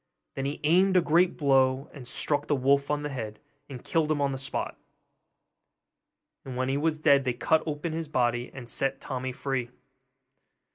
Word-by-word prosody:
Then 135 - -3
he 140 +2 -3
aimed 185 +5 +4
a - - +6
great 175 +3 +3
blow, 135 -1 +3
and 130 -5 -10
struck 145 +3 -1
the 145 - +2
wolf 140 +1 +2
on 150 0 0
the 150 - -2
head, 110 -6 -6 0.3
and 130 -3 -8
killed 160 -2 0
him 150 - +1
on 140 -1 +1
the 135 - -4
spot! 135 - -3 1.7
and 130 -2 -7
when 130 +1 0
he 135 - +1
was 155 +1 0
dead 140 -3 +4
they 125 -2 0
cut 155 +6 +2
open 155 +2 -3
his 165 0 -3
body, 120 -3 0
and 125 -3 -9
set 135 +3 -1
Tommy 130 -1 -4
free. 130 -2 -3
140 Hz, 185 wpm, -28 LUFS, 130-150 Hz, 1.7 s, a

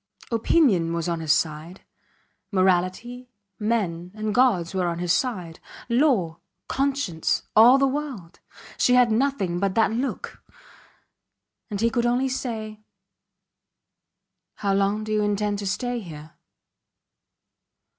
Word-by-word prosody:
Opinion 225 - +2
was 170 0 -2
on 170 -1 -2
his 160 -2 0
side; 160 +4 -1 0.7
morality, 190 +7 0 0.3
men 195 -6 -1
and 215 -1 -3
gods 210 -9 +2
were 185 -2 0
on 170 -1 -2
his 175 -1 0
side; 185 -11 -2 0.3
law, 235 - +1 0.3
conscience 270 - -1
all 235 +5 +8
the 275 - +3
world! 265 - -4 0.4
She 250 - +4
had 250 -2 +4
nothing 220 -8 0
but 195 -1 -1
that 225 0 +3
look. 250 +4 -4 1.3
And 205 -2 -4
he 230 0 +2
could 240 -1 +1
only 250 +2 +1
say: 220 -4 -5 1.7
How 200 -1 -1
long 200 +2 +1
do 215 - -6
you 215 - +2
intend 205 0 -1
to 200 - -4
stay 245 +5 -2
here? 155 -6 -10
210 Hz, 125 wpm, -24 LUFS, 175-245 Hz, 1.7 s, all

